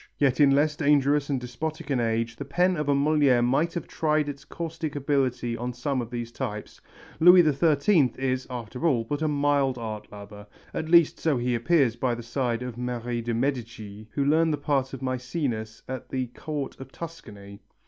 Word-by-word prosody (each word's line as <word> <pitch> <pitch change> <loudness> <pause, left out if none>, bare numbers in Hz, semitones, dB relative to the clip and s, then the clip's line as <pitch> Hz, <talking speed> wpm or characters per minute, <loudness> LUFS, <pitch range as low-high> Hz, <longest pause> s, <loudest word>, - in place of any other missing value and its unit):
Yet 135 -2 +2
in 145 -2 +6
less 145 +2 +3
dangerous 145 -1 +2
and 135 -2 0
despotic 150 +5 -5
an 130 - +1
age 115 0 -1
the - - -5
pen 180 +7 +1
of 150 -2 -2
a 140 - +4
Molière 140 -4 +3
might 150 +7 +1
have 170 - -4
tried 155 -1 0
its 140 -1 -6
caustic 165 -2 -5
ability 130 -4 0
on 120 +2 -4
some 130 +2 -2
of 115 - -6
these 120 -1 -5
types. 105 -2 -6 0.4
Louis 180 +2 +8
XIII 150 0 +3
is, 130 -1 -1
after 125 +4 -3
all, 125 -7 +2
but 145 +6 -4
a 155 - +1
mild 145 -3 +1
art 110 -3 -6
lover, 105 0 -11 0.3
at 160 - -3
least 170 -2 +5
so 155 -5 +1
he 125 0 0
appears 125 0 +2
by 120 0 0
the 120 - -8
side 120 0 -2
of 125 -1 -6
Marie 120 -1 -3
de 115 0 -2
Médicis 115 -5 -3
who 140 - 0
learned 160 +3 +3
the - - -1
part 140 -2 0
of 135 - -7
Mæcenas 125 -4 -3
at 130 -1 -6
the 130 -1 -1
court 150 -3 -5
of 135 0 -10
Tuscany. 105 -13 -10
135 Hz, 190 wpm, -26 LUFS, 120-150 Hz, 0.4 s, Louis